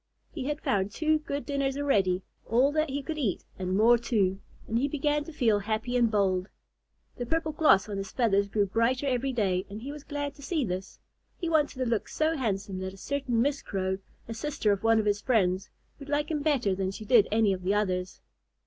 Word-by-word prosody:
He 275 -6 -5
had 295 +2 -2
found 195 -1 +1
two 310 +6 +1
good 285 -1 -4
dinners 275 -1 -1
already, 195 -10 +1 0.2
all 250 +6 +3
that 310 0 +1
he 280 +1 -3
could 310 +1 -4
eat 220 -10 -1
and 185 0 -1
more 235 +3 +6
too, 200 -5 +1 0.3
and 225 +1 +1
he 275 - +1
began 295 +1 0
to 325 - -8
feel 230 -9 +2
happy 220 +4 -2
and 240 -2 +4
bold. 190 -3 +1 0.7
The 245 - -3
purple 320 +2 0
gloss 300 -11 +4
on 205 -2 -4
his 195 -1 -5
feathers 200 -5 +2
grew 205 0 +2
brighter 230 +7 +1
every 265 0 0
day, 190 -6 0
and 205 +2 -7
he 280 - -5
was 295 -1 -9
glad 290 -1 -4
to - - -16
see 295 -1 -1
this. 185 0 -5 0.4
He 340 - -3
wanted 300 -4 +2
to 255 - -1
look 230 -3 0
so 315 +1 +1
handsome 200 -7 -2
that 190 0 -5
a - - -15
certain 250 0 0
Miss 285 +1 0
Crow, 190 -1 -2 0.3
a 225 - -4
sister 225 -2 -1
of 200 -1 0
one 225 0 +4
of 220 - +1
his 205 0 +1
friends, 190 -7 +1 0.3
would 280 0 -10
like 295 +2 0
him 300 -2 -1
better 275 -10 +2
than 190 0 -1
she 205 +3 -7
did 225 -2 +5
any 215 -2 +3
of 185 - -5
the 190 +3 +1
others. 185 -3 -1
230 Hz, 220 wpm, -28 LUFS, 195-285 Hz, 0.7 s, more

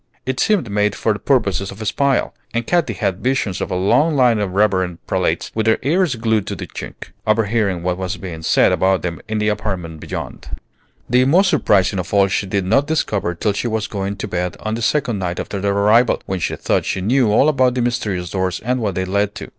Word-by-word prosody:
It 130 0 -2
seemed 185 - +1
made 105 0 +1
for 110 - 0
purposes 100 -8 +1
of 100 - -10
espial; 135 +5 0 0.2
and 115 0 0
Katy 170 -7 +1
had 95 -1 -2
visions 125 -7 -1
of - - -2
a - - -2
long 145 - +2
line 125 -5 +4
of 100 -3 -2
reverend 95 -4 +1
prelates - - -1
with 110 0 -1
their 110 - +4
ears 160 +1 +2
glued 110 -3 0
to - - -3
the - - -6
chink, - - -9 0.2
overhearing 105 -4 +1
what 90 0 -1
was 95 0 -3
being 85 -3 -7
said - - +3
about 95 0 +2
them 85 -2 -4
in 110 0 -2
the 105 0 +1
apartment 95 -6 -3
beyond. - - -7 0.5
The 125 +1 +3
most 185 +8 +4
surprising 95 -1 +2
of 90 - -3
all 100 -1 +5
she 100 +1 -1
did 95 -1 -1
not 135 +9 +2
discover 105 - -1
till 100 +4 0
she 110 - -2
was 110 -2 -1
going 100 -1 -3
to 105 - -5
bed 90 -2 -3
on 110 - -3
the 115 - -3
second 120 -4 0
night 90 -2 -3
after 100 - -4
their 100 0 +1
arrival, 110 +4 +4
when 95 -1 -3
she - - -2
thought - - 0
she 95 - -2
knew 120 +2 +2
all 125 +7 +4
about 130 -4 +2
the 125 - 0
mysterious 105 -7 -2
doors 95 -2 -1
and 125 +3 -1
what 105 -6 -2
they 95 - -1
led 100 +2 0
to. - - -8
105 Hz, 225 wpm, -19 LUFS, 95-120 Hz, 0.5 s, all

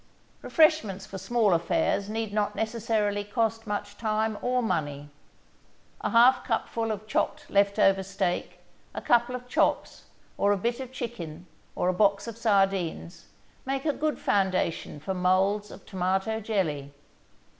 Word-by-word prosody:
Refreshments 220 - +2
for 195 - -8
small 225 -2 +2
affairs 170 +4 +1
need 220 -1 -3
not 210 0 0
necessarily 220 -2 -1
cost 225 +1 -1
much 205 -1 -4
time 220 -1 0
or 250 0 +1
money. 145 -7 -2 0.9
A - - 0
half 240 +3 +5
cupful 225 -1 -1
of 215 0 -5
chopped 215 - -1
left 200 0 +3
over 195 0 +4
steak, 190 -2 -3 0.3
a - - -4
couple 240 +1 +3
of 250 0 -8
chops - - 0 0.3
or 200 - +3
a 205 - +2
bit 235 +5 -1
of 260 -1 -6
chicken 185 -10 -6 0.3
or - - 0
a 185 - +2
box 200 +2 +2
of 230 - -6
sardines, 195 -6 0 0.4
make 270 +1 -3
a 300 - +2
good 305 +1 -1
foundation 185 -6 0
for 170 +6 -3
molds 190 +3 +1
of - - -12
tomato 190 +4 -1
jelly. 165 -10 -2
205 Hz, 145 wpm, -27 LUFS, 190-230 Hz, 0.9 s, half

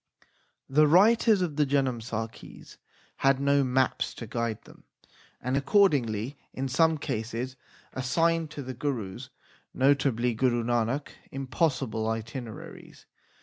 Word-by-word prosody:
The 150 +3 +4
writers 210 +4 +5
of 155 -5 -3
the 150 - +4
Janamsakhis 120 -5 -3 0.4
had 135 -1 +3
no 140 0 +3
maps 130 0 0
to 115 - -7
guide 115 -1 -2
them, - - -17 0.6
and 125 +2 -2
accordingly 135 - +2
in 135 +1 -3
some 160 +4 +3
cases 125 -2 -4 0.4
assigned 165 +5 +1
to 145 -1 -7
the 130 0 -6
Gurus, 120 -8 -4 0.5
notably 130 -3 +2
Guru 120 0 +1
Nanak, 120 +4 0 0.2
impossible 135 - -1
itineraries. 115 0 -7
130 Hz, 110 wpm, -28 LUFS, 115-145 Hz, 0.6 s, writers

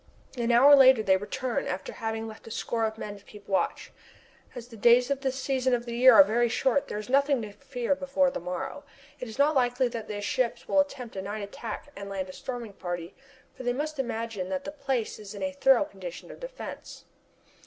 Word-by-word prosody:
An 240 -1 0
hour 270 +5 +8
later 260 -4 +7
they 190 -2 +4
return 230 +5 -2
after 185 - -4
having 225 0 -3
left 220 0 -11
a - - -7
score 225 +1 -1
of 220 0 -3
men 205 -2 -7
to - - -22
keep 205 -2 -15
watch. 195 - -1 0.6
As 245 0 -8
the 230 - -11
days 240 +4 +5
at 275 -1 -1
this 265 -1 -1
season 260 -1 +1
of 240 0 -5
the 235 -1 -5
year 255 +2 +7
are 290 - +10
very 240 -2 +1
short 265 +4 +1
there - - -4
is 210 - -6
nothing 280 +1 +3
to 210 - -7
fear 245 +5 -2
before 275 0 +1
the - - -4
morrow. 180 - -5 0.4
It 250 - -5
is 220 - -9
not 290 +2 +4
likely 250 -1 +2
that 230 -2 -6
the 205 -1 -4
ships 235 +3 -1
will 290 - +3
attempt 275 -6 -2
a - - -2
night 205 +2 -5
attack 210 +2 -7
and 200 0 -7
land 190 -1 -4
a - - -8
storming 240 -3 -6
party, 175 -1 -5 0.4
for - - -9
they 245 -1 0
must 300 +2 -4
imagine 225 -6 -3
that 185 -1 -2
the 290 - -5
place 270 -8 -2
is 210 -1 -9
in 200 - -5
a 285 - -1
thorough 270 -1 +4
condition 185 - -9
of - - -12
defence. - - -9
240 Hz, 225 wpm, -28 LUFS, 210-270 Hz, 0.6 s, are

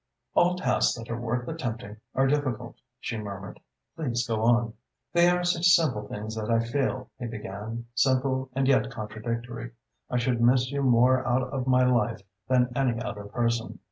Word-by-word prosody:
"All 180 +1 +4
tasks 125 -8 +1
that 115 +1 -7
are 120 0 -3
worth 120 +1 -2
attempting 115 -9 -5 0.2
are 135 - +3
difficult," 130 -4 -1 0.2
she 115 -3 -4
murmured. 100 -2 -7 0.4
"Please 120 -7 -1
go 110 -2 -1
on." 115 0 +3 0.4
"They 175 0 +5
are 180 0 +1
such 175 0 +2
simple 155 -11 +3
things 110 +1 -5
that 110 0 -4
I 115 0 +4
feel," 130 +1 -1
he 120 - -4
began, 110 +1 -6
"simple 130 +1 +1
and 135 0 +1
yet 130 -2 +3
contradictory. 115 +1 -5 0.4
I 125 - 0
should 120 -1 +1
miss 125 +2 +4
you 140 0 -1
more 130 0 +4
out 125 +1 +2
of 130 0 -3
my 130 0 +4
life 115 -4 +1 0.2
than 125 -1 +3
any 125 -4 +1
other 105 -4 -5
person. 115 +2 -1
120 Hz, 175 wpm, -27 LUFS, 115-130 Hz, 0.4 s, They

